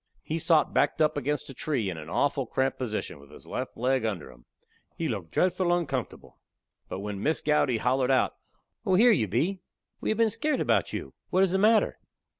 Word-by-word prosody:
He 160 +2 -3
sot 160 -1 +3
backed - - +2
up 155 -1 +3
against 145 0 -2
a - - -9
tree 130 -5 -1
in 90 - -3
a 80 -1 -8
awful 135 +4 0
cramped 130 +3 -1
position, 110 - -4
with 70 0 -16
his 75 - -14
left - - -5
leg 130 +1 +1
under 95 - -3
him. - - -19 0.5
He 165 - -2
looked 100 - -4
dretful 180 - +1
uncomfortable. 145 -9 -3 0.5
But 95 - -5
when 100 -1 -5
Miss 155 +6 +1
Gowdy 145 -5 +2
hollered 125 +2 +1
out: 130 - +3 0.5
"Oh, 190 - +2
here 235 +5 +6
you 115 - +2
be! 165 - 0 0.4
We - - -3
have 215 - +1
been 225 -1 +3
skairt 305 +7 0
about - - +1
you. - - -5 0.2
What 185 - +3
is 190 - +2
the 190 - +1
matter?" 215 +2 +3
135 Hz, 205 wpm, -27 LUFS, 110-175 Hz, 0.5 s, here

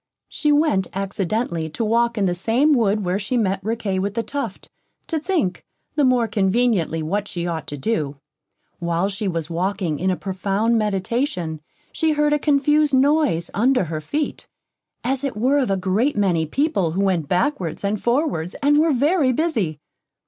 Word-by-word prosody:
She 300 - 0
went 290 - +2
accidentally 195 -3 -2
to 225 +9 -3
walk 235 +1 +1
in 200 - +2
the 180 - +1
same 230 +11 +2
wood 210 -5 +1
where 180 +2 0
she 215 +5 -1
met 195 -4 0
Riquet 215 -3 -1
with 200 +2 -2
the 230 - 0
Tuft, 275 -8 -5 0.4
to 320 - -2
think, 300 - -1 0.3
the 295 - +1
more 250 -3 +3
conveniently, 195 -5 +1
what 200 +6 -2
she 175 -3 -4
ought 165 -2 -3
to 145 - -5
do. 150 -4 -1 0.6
While 170 +2 0
she 205 +1 -3
was 165 -3 -3
walking 175 -3 -1
in 185 - 0
a 185 - +1
profound 195 +5 -1
meditation, 195 - -2 0.3
she 320 -1 +1
heard 300 0 +2
a 295 - +2
confused 295 0 +3
noise 275 - +2
under 250 +2 +3
her 155 -2 -4
feet, 290 - -3 0.6
as 265 +2 -1
it 270 -6 -3
were 260 +6 +3
of 260 - 0
a 195 - +1
great 200 +9 0
many 175 -6 +1
people 195 - 0
who 195 +3 0
went 180 -6 +1
backwards 180 - -1
and 200 +1 -1
forwards, 240 - 0
and 295 +1 +4
were 320 -1 +3
very 285 +1 +3
busy. 230 - 0
210 Hz, 175 wpm, -22 LUFS, 180-270 Hz, 0.6 s, and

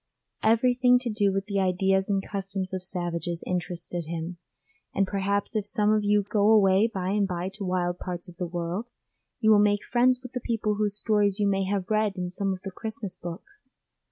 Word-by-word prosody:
Everything 245 +3 +4
to 245 -2 -3
do 205 -2 +2
with 195 0 -2
the 200 -1 -1
ideas 190 +1 +1
and 195 -1 0
customs 195 -2 -4
of 185 - -2
savages 175 -2 -2
interested 175 -1 -3
him, 165 +2 -5 0.6
and 195 - +3
perhaps 200 +2 -1
if 215 - +1
some 210 +1 +1
of 215 -1 +2
you 205 0 +3
go 210 0 +3
away 200 -1 +5
by 185 -3 -2
and 205 -1 +2
bye 180 0 -3
to 205 - -6
wild 180 -1 -1
parts 180 0 -5
of 175 -1 -13
the 180 - -2
world, 175 +6 -3 0.5
you 220 -1 +5
will 210 - +7
make 205 0 +3
friends 250 +1 +3
with 255 - -8
the 250 - -2
people 225 -3 -1
whose 205 -1 0
stories 210 -2 +2
you 205 - +2
may 195 -1 +1
have 195 0 -2
read 215 -2 +2
in 180 -1 -3
some 195 +1 -1
of 185 -1 -5
the 195 - -5
Christmas 215 -1 -5
books. 225 - -10
195 Hz, 205 wpm, -27 LUFS, 180-215 Hz, 0.6 s, will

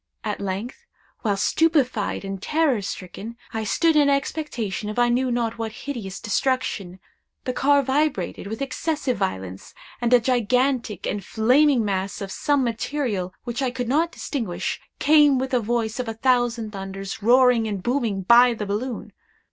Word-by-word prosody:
At 210 -2 -3
length, 205 - -5 0.3
while, 205 -4 0
stupefied 255 -3 +1
and 195 -1 -5
terror 300 -5 +1
stricken, 200 +4 -7 0.2
I 220 0 -2
stood 325 +9 +2
in 290 -2 +5
expectation 265 -8 -2
of 215 - -6
I 240 0 +4
knew 255 +2 +1
not 235 -2 -1
what 225 -1 -3
hideous 220 -9 -5
destruction, 210 -5 -1 0.4
the 255 - -2
car 280 +2 +3
vibrated 265 - -1
with 220 +6 -4
excessive 290 -1 -2
violence, 95 0 -4 0.3
and 240 0 +1
a 245 - +7
gigantic 250 -2 0
and 205 - -2
flaming 250 +4 +3
mass 195 -1 -2
of 195 -1 -5
some 285 +4 +1
material 230 -5 -2
which 240 +1 -4
I 260 - +1
could 245 -1 -4
not 325 +5 +2
distinguish, 230 - -3 0.2
came 295 -2 +5
with 260 +1 -3
a 250 - +4
voice 230 +1 -1
of 250 - -2
a 225 - -4
thousand 240 -2 +1
thunders, 195 0 -6
roaring 245 0 +5
and 200 -4 -4
booming 235 -6 0
by 240 +4 +6
the 215 - -4
balloon. 220 +5 -4
240 Hz, 160 wpm, -23 LUFS, 205-265 Hz, 0.4 s, a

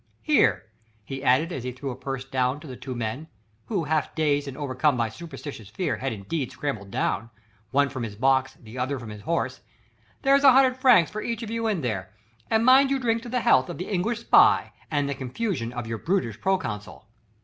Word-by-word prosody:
Here," 130 - +3 0.4
he 135 +3 -6
added 140 +7 +3
as 135 -8 -4
he 125 - -3
threw 130 +2 -5
a - - -6
purse 135 0 -5
down 130 0 0
to - - -11
the 130 -4 -7
two 130 0 -7
men 120 +6 -4 0.4
who 195 -7 -1
half 155 0 -1
dazed 145 -2 +1
and 135 - -7
overcome 140 -1 +1
by 115 -1 0
superstitious 145 - -9
fear 110 - -2
had 135 - -2
indeed 115 +7 -4
scrambled 110 -9 -4
down, 110 +3 -1 0.4
one 140 +1 +3
from 130 -2 -6
his 110 -3 -5
box, 130 +3 +2
the 115 +2 -10
other 135 +2 -1
from 120 -3 -8
his 105 -1 -9
horse 170 +8 -2 0.6
"there's 275 0 +4
a 270 -2 +8
hundred 260 -1 +4
francs 250 -10 +5
for 215 - -4
each 230 0 -3
of 225 - -6
you 230 0 -1
in 205 -7 0
there, 95 -7 -3 0.4
and 225 +1 +2
mind 265 +2 +7
you 275 - +2
drink 230 -3 0
to 240 - -8
the 250 0 0
health 130 - +4
of - - -5
the 180 +4 -5
English 215 +5 -1
spy - - +5 0.2
and 145 -2 0
the 140 - -1
confusion 130 - -3
of 120 -2 -5
your 115 -1 -4
brutish 165 - -1
proconsul." 110 - -2
140 Hz, 215 wpm, -25 LUFS, 125-200 Hz, 0.6 s, a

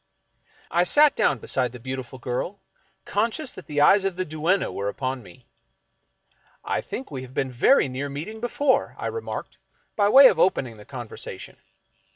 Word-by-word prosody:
I 170 - +3
sat 290 +11 +5
down 140 - +2
beside 125 +1 -1
the 125 - -9
beautiful 130 0 -6
girl, 130 +11 -4 0.5
conscious 230 +7 -1
that 185 - -11
the 145 -1 0
eyes 195 +7 +6
of 195 -2 -1
the 185 +1 -2
duenna 160 +5 0
were 100 +1 -3
upon 130 +3 -3
me, 90 -6 -16 0.6
" - - -39
I - - 0
think 135 - -7
we 135 -3 -5
have 130 +1 -11
been 135 -1 -1
very 135 - +4
near 135 +2 -4
meeting 165 +11 -6
before," 260 +4 0
I - - -6
re 455 - -3
marked, - - -7 0.4
by 205 -1 +3
way 270 +5 +9
of 190 -10 +6
opening 130 -11 +1
the 105 - -13
conversation. 120 -5 -8
145 Hz, 180 wpm, -24 LUFS, 130-205 Hz, 0.6 s, way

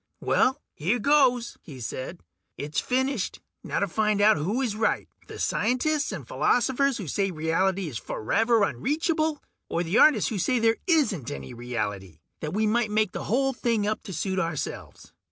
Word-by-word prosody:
"Well, 265 +3 +2
here 185 +11 0
goes," 250 -1 +2
he 135 -5 -11
said. 125 -2 -6 0.4
"It's 145 0 -2
finished. 260 - -1 0.2
Now - - -3
to 200 - +2
find 210 +2 +1
out 215 +1 +6
who 190 - -1
is 240 -6 -1
right, 220 - 0 0.2
the - - -9
scientists 285 +7 0
and - - -7
philosophers 265 +1 +2
who 195 - -6
say 195 +6 0
reality 180 +3 0
is 120 -7 -5
forever 225 - +1
unreachable, 310 - 0 0.3
or 170 - 0
the 180 +7 +1
artists 305 -4 +5
who 210 - -2
say 250 +8 +1
there 225 0 +3
isn't 260 - +2
any 70 -1 -7
reality 105 -8 -4 0.2
that 155 - -4
we 215 +3 +1
make 215 -2 +1
the - - -5
whole 270 +4 +1
thing 230 -4 0
up 215 +1 -1
to 195 - -6
suit 190 +1 -2
ourselves." 165 -4 -5
215 Hz, 170 wpm, -26 LUFS, 165-250 Hz, 0.4 s, out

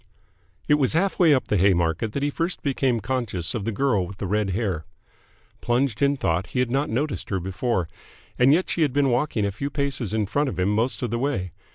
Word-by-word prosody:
It 150 0 +4
was 135 -1 +2
half 190 +4 +1
way 170 -4 +6
up 135 -3 +2
the 105 - +1
Haymarket 90 +2 +2
that 140 - -2
he 145 - +1
first 170 +4 -2
became 130 -5 +1
conscious 105 -7 -2
of 110 -4 -3
the 115 - 0
girl 110 -6 +1
with 100 - -10
the - - -4
red 105 +1 0
hair. 95 -5 -1 0.8
Plunged 120 -2 0
in 140 0 +3
thought, 90 -4 0
he 125 - -3
had 125 -2 +1
not 140 +3 0
noticed 140 +6 -2
her 95 - 0
before. 95 +1 -1 0.5
And 125 +2 +6
yet 175 +5 +3
she 170 - -2
had 145 -5 +2
been 140 -2 +2
walking 120 -4 0
a 100 - -1
few 140 +8 -4
paces 140 -7 -2
in 110 -1 0
front 145 +8 0
of 90 - -6
him 90 +2 +2
most 110 +2 0
of 120 - -2
the 115 - -1
way. 120 -10 -1
120 Hz, 230 wpm, -24 LUFS, 100-140 Hz, 0.8 s, way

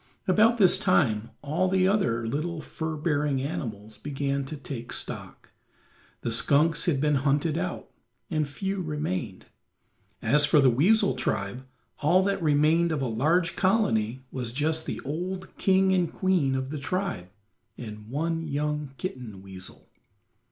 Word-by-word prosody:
About 215 +5 +4
this 190 -3 +5
time 120 - +2
all 160 +6 0
the 185 0 +3
other 120 - +1
little 155 +7 -2
fur 160 0 -5
bearing 150 -3 0
animals 110 -7 -5
began 140 -1 -2
to 150 +3 -6
take 130 -4 -7
stock; - - -4 0.7
the 120 - -2
skunks 150 +7 +3
had 155 -6 +1
been 150 0 +2
hunted 145 +2 +1
out, 175 +1 -3 0.4
and 155 -2 -1
few 195 +6 -3
remained; 150 - -3 0.7
as 150 0 +3
for 150 0 +5
the 135 -3 +5
weasel 165 - +4
tribe, 125 0 -3 0.3
all 175 +6 +4
that 195 -1 0
remained 155 +2 +3
of 150 -3 -1
a - - 0
large 165 +10 +1
colony 130 - +1
was 125 -3 -3
just 155 +5 0
the - - -3
old 180 +6 -5
king 190 0 +3
and 180 -3 +1
queen 180 -8 +1
of 130 +1 -3
the 155 - -4
tribe 180 - -3 0.5
and 105 -2 -9
one 165 +4 -2
young 150 -1 -2
kitten 120 - -6
weasel. 95 -1 -9
150 Hz, 145 wpm, -27 LUFS, 130-175 Hz, 0.7 s, this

